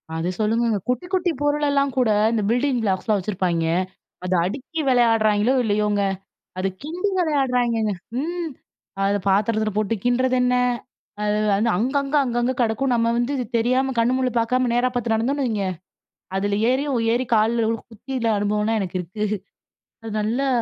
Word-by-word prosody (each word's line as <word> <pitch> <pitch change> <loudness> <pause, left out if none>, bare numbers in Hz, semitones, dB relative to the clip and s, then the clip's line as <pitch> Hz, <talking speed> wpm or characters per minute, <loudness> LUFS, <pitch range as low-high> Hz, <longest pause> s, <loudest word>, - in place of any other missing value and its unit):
அது 165 +2 -1
சொல்லுங்கங்க. 225 +1 +1
குட்டி 250 +6 0
குட்டி 365 -2 +2
பொருளெல்லா 290 -1 +2
கூட 250 -3 +3 0.2
இந்த 230 -2 0
பில்டிங் 250 +2 +1
ப்ளாக்ஸ்லாம் 205 +1 +1
வச்சுருப்பாங்க. 180 -4 -1 0.6
அத 185 0 -1
அடுக்கி 275 - -5
விளையாடுறாய்ங்களோ 225 -2 +3
இல்லையோங்க. 210 -1 +1 0.6
அது 190 - 0 0.2
கிண்டி 350 +7 -2
விளையாடுறாய்ங்கங்க. 250 - +1 0.3
ம். 340 +2 -3 0.6
அத 200 +1 +2
பாத்திரத்துல 215 +2 +1
போட்டு 215 +1 +1
கிண்டறதென்ன 250 0 +2 0.7
அது 210 0 +1 0.2
வந்து 215 +4 +2
அங்கங்க, 275 +6 0
அங்கங்க 240 0 0
கிடக்கும் 235 +3 +1
நம்ம 230 -1 +2
வந்து 240 +3 0
இது 250 - -2
தெரியாம 255 +3 +1
கண்ணு 235 +2 +3
முண்ணு 255 -1 0
பாக்காம 250 +2 +1
நேரா 245 +1 +2
பாத்து 235 -2 0
நடந்தோன்னு 265 +5 0
வைங்க, 215 -5 -1 0.7
அதுல 200 +1 0
ஏறியும் 265 0 0
ஏறி 250 +2 0
கால்ல 225 +1 +2 0.2
குத்தி 225 +5 -9 0.2
அனுபவம்லாம் 210 +2 0
எனக்கு 185 -1 -3
இருக்கு 185 +5 -5 0.8
அது 225 - -6
நல்லா 235 +6 0
235 Hz, 140 wpm, -22 LUFS, 210-260 Hz, 0.8 s, கூட